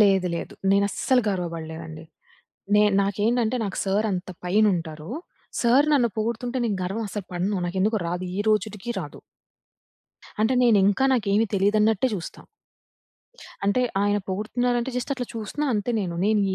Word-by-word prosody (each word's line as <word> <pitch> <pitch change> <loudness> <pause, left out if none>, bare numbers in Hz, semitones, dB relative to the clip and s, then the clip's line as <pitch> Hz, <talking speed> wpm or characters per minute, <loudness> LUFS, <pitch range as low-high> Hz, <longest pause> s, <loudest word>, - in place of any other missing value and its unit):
లేదు 195 -3 +4
లేదు. 170 - -5 0.2
నేను 200 +1 +4
అస్సలు 255 +5 +2
గర్వబడలేదండి. 165 -3 -5 0.7
నే 210 - +6 0.2
నాకేంటంటే 220 +5 +1
నాకు 195 - -4
సార్ 200 +3 +1
అంత 180 0 -4 0.2
పైన 200 +5 +3
ఉంటారు. 160 -1 -6 0.5
సార్ 255 +5 +5
నన్ను 245 -4 +3
పొగుడుతుంటే 235 +3 -2
నేను 210 -4 -1
గర్వం 205 +5 -3
అసలు 205 -1 -5
పడను. 185 +3 -1
నాకు 180 +2 -3
ఎందుకొ 215 +2 +2
రాదు, 180 +2 -3
ఈ - - +1
రోజుటికి 215 +1 -1
రాదు. - - -8 1.2
అంటే 220 +4 +3
నేను 230 -4 +5
ఇంకా, 205 +6 +2
నాకేమి 215 -1 +2
తెలీదన్నట్టే 210 +3 +3
జూస్తా. 175 -4 -7 1.2
అంటే 200 +5 +2 0.2
ఆయన 205 0 +2
పొగుడుతున్నారంటే 240 +5 -1
జస్ట్ 250 +3 -2
అట్ల 255 -2 -3
చూస్తున్నా 230 +7 -3
అంతే 210 +3 -1
నేను. 180 -4 -3
నేను 215 0 +3
205 Hz, 145 wpm, -24 LUFS, 190-230 Hz, 1.2 s, నే